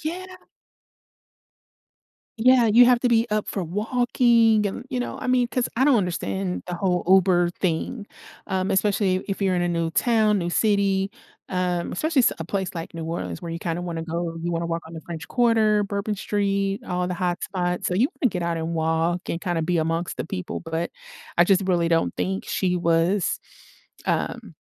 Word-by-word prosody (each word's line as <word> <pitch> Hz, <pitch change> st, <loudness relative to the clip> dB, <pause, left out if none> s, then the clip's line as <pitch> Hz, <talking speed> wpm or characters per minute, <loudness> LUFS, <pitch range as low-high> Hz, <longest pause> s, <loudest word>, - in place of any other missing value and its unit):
Yeah 350 Hz, +4 st, -4 dB, 2.1 s
Yeah, 250 Hz, +1 st, +5 dB
you 235 Hz, +3 st, +7 dB
have 245 Hz, -1 st, +5 dB
to 250 Hz, -, +2 dB
be 230 Hz, -1 st, +3 dB
up 215 Hz, 0 st, 0 dB
for 195 Hz, -, -3 dB
walking 225 Hz, +3 st, +2 dB
and, 225 Hz, +5 st, -5 dB
you 255 Hz, -, -3 dB
know, 245 Hz, -, -4 dB
I -, -, -4 dB
mean, 250 Hz, -1 st, +3 dB
'cause 250 Hz, 0 st, -1 dB
I 260 Hz, -, +3 dB
don't 285 Hz, -3 st, +5 dB
understand 95 Hz, -, -2 dB
the 180 Hz, -, -4 dB
whole 180 Hz, 0 st, 0 dB
Uber 180 Hz, -2 st, +4 dB
thing, 190 Hz, +5 st, -2 dB, 0.4 s
um, 190 Hz, -1 st, -1 dB
especially 195 Hz, -1 st, +2 dB
if 195 Hz, +1 st, -3 dB
you're 190 Hz, -1 st, +2 dB
in 180 Hz, -, +1 dB
a 175 Hz, -, 0 dB
new 170 Hz, -1 st, -1 dB
town, 215 Hz, 0 st, +2 dB
new 175 Hz, -2 st, -2 dB
city, 195 Hz, 0 st, +1 dB, 0.4 s
um, 180 Hz, -2 st, -1 dB
especially 310 Hz, -, +1 dB
s 240 Hz, -, +4 dB
a 165 Hz, -, -4 dB
place 190 Hz, +1 st, -3 dB
like 165 Hz, 0 st, -6 dB
New 165 Hz, -, -5 dB
Orleans 90 Hz, -, -4 dB
where 170 Hz, -, -5 dB
you 165 Hz, -, -4 dB
kinda 170 Hz, +1 st, -3 dB
wanna 170 Hz, -2 st, -4 dB
go 170 Hz, 0 st, -3 dB
you 175 Hz, -, -2 dB
wanna 170 Hz, 0 st, -1 dB
walk 165 Hz, 0 st, -2 dB
on 165 Hz, -, -11 dB
the 160 Hz, -, -6 dB
French 165 Hz, -3 st, -7 dB
Quarter, 220 Hz, -4 st, +3 dB
Bourbon 200 Hz, +1 st, -2 dB
Street, 200 Hz, 0 st, -1 dB
all 180 Hz, 0 st, -1 dB
the 180 Hz, -, -2 dB
hotspots, 180 Hz, 0 st, -2 dB
so -, -, 0 dB
you 235 Hz, +9 st, +3 dB
wanna 255 Hz, -, +4 dB
get 180 Hz, -3 st, -3 dB
out 170 Hz, 0 st, -1 dB
and 165 Hz, +1 st, -3 dB
walk, 165 Hz, +2 st, 0 dB
and 165 Hz, -, -2 dB
kinda 175 Hz, -3 st, -1 dB
be 175 Hz, +2 st, 0 dB
amongst 165 Hz, +2 st, -1 dB
the -, -, -3 dB
people, 185 Hz, +1 st, -5 dB
but 165 Hz, 0 st, -3 dB, 0.5 s
I 175 Hz, -, +6 dB
just 190 Hz, +1 st, +4 dB
really 170 Hz, -2 st, +2 dB
don't 165 Hz, -1 st, +1 dB
think 190 Hz, +1 st, -2 dB
she 180 Hz, -2 st, 0 dB
was, 170 Hz, +2 st, +1 dB, 0.7 s
um -, -, -2 dB
185 Hz, 190 wpm, -24 LUFS, 170-210 Hz, 2.1 s, you